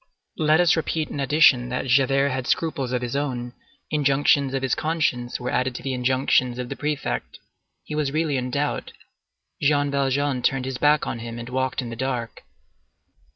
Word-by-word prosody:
Let 155 +1 +4
us 175 -2 +5
repeat 160 -1 -2
in - - -5
addition 135 -3 +4
that 125 +1 -2
Javert 135 +2 +3
had 130 -1 -3
scruples 150 -6 -1
of 125 -1 -1
his 120 +2 -3
own; 125 -4 -3 0.4
injunctions 140 -2 +3
of 135 - -2
his 130 - +1
conscience 150 -7 -1
were 125 0 -3
added 130 -1 0
to - - -7
the 135 0 -2
injunctions 125 -1 +1
of 125 -1 -4
the - - -4
prefect. 140 - -3 0.5
He - - -8
was 150 -2 0
really 155 -1 0
in 125 -1 -2
doubt. 145 +3 -2 0.7
Jean 145 0 +2
Valjean 140 -1 0
turned 130 +1 +1
his 130 -1 -4
back 150 0 +3
on - - -4
him 115 0 -7
and 120 +1 -7
walked 130 0 -1
in 120 - -6
the - - -5
dark. 125 -2 -3
135 Hz, 185 wpm, -24 LUFS, 125-145 Hz, 0.7 s, us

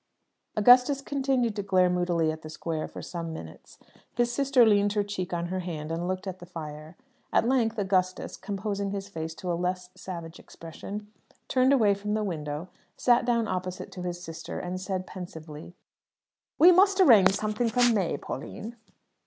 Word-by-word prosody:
Augustus 250 +5 +6
continued 265 -5 0
to 205 - -2
glare 185 -2 +3
moodily 175 -3 +1
at 160 0 -7
the 155 - -9
square 160 0 -4
for - - -9
some 170 -2 -5
minutes. 80 - -10 0.4
His 240 0 +1
sister 270 -2 +4
leaned 205 -1 +3
her 205 -1 +1
cheek 195 -3 -4
on 175 0 -2
her 185 +1 -2
hand, 160 -4 -5
and 170 +2 -2
looked 185 +1 -3
at 185 -1 -5
the 175 - -11
fire. 155 -1 -8 0.3
At 230 - +3
length 235 -3 +2
Augustus, 185 -2 0
composing 200 0 -3
his 200 0 -4
face 160 -4 -6
to 180 +1 -4
a - - +1
less 180 +1 -2
savage 170 -2 -8
expression, 205 +6 -9 0.4
turned 260 +1 +3
away 220 -7 +5
from 205 +1 -3
the 215 - 0
window, 155 -3 -4 0.3
sat 240 -1 +3
down 235 -2 +1
opposite 185 -1 -4
to 180 - -8
his 175 -1 -4
sister, 165 -2 -7
and 185 +1 -4
said, 185 -1 -3
pensively 160 -3 -9 0.8
"We 345 +3 +8
must 390 +2 +5
arrange 210 - +7
something 215 +3 -1
for 245 +2 +4
May, 185 -8 0
Pauline." 215 - -7
185 Hz, 175 wpm, -27 LUFS, 175-220 Hz, 0.8 s, We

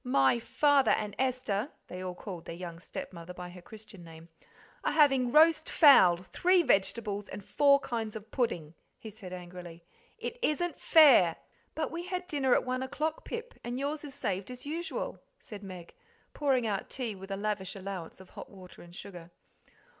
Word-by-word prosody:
"My 235 - +3
father 285 +3 +3
and 210 -1 0
Esther" 255 -3 -1 0.2
(they 180 - -8
all 180 -1 -5
called 180 -3 -8
their 165 - -6
young 170 -1 -8
stepmother 170 0 -8
by 180 0 -8
her 180 0 -12
Christian 215 -2 -12
name) 165 0 -13 0.5
"are - - 0
having 270 -5 +4
roast 315 +3 +5
fowl, 190 - +7
three 350 - +2
vegetables, 205 -2 0
and 205 - -8
four 280 -1 +4
kinds 225 -3 -4
of 220 +1 -9
pudding," 170 - -1 0.2
he 220 - -10
said 195 -3 -11
angrily; 175 -2 -9 0.3
"it 485 - -6
isn't 350 -1 -1
fair!" 260 - +6 0.4
"But 310 0 -2
we 340 +2 -5
had 365 0 -3
dinner 270 -5 +2
at - - +1
one 255 0 -2
o'clock, 305 +4 -3
Pip, 470 +1 -6
and 240 +1 -4
yours 290 +3 -3
is 285 -2 -8
saved 195 -8 -3
as 250 +1 -9
usual," 330 +4 -4 0.2
said 210 -2 -10
Meg, 185 -4 -10 0.4
pouring 270 -5 +1
out 200 -3 -2
tea 245 -5 -3
with 195 0 -11
a 195 - -3
lavish 205 -2 -3
allowance 190 -4 -7
of 190 - -15
hot - - -10
water 185 -2 -14
and 175 0 -14
sugar. 175 -3 -10
215 Hz, 175 wpm, -30 LUFS, 180-280 Hz, 0.5 s, fowl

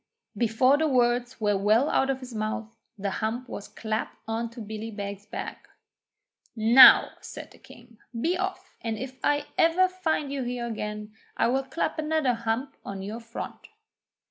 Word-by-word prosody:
Before 245 +4 +3
the 315 - +2
words 245 -2 +1
were 205 -2 +2
well 215 +7 +3
out 270 -2 +2
of 270 -1 -1
his 250 -1 -9
mouth 220 +1 -4 0.2
the 200 0 -2
hump 225 +5 -3
was 205 - -7
clapt 220 0 -4
on 225 +1 -2
to 235 +1 -12
Billy 220 +1 -6
Beg's 200 -1 -6
back. - - -7 0.9
'Now,' 235 +3 +8
said - - -9
the - - -18
King, 235 -2 -17 0.2
'be 335 +9 +1
off, 380 +1 -4
and 225 -1 -3
if 260 +2 -7
ever 310 +4 +2
I - - +5
find 325 -6 -2
you 275 - -2
here 245 -1 -3
again, 210 -2 -5 0.2
I 230 - +3
will 265 +2 +2
clap 315 +4 -2
another 310 -4 +1
hump 235 +4 -3
on 195 -1 -6
to - - -6
your 215 +3 -5
front!' 230 0 -8
235 Hz, 170 wpm, -27 LUFS, 220-270 Hz, 0.9 s, Now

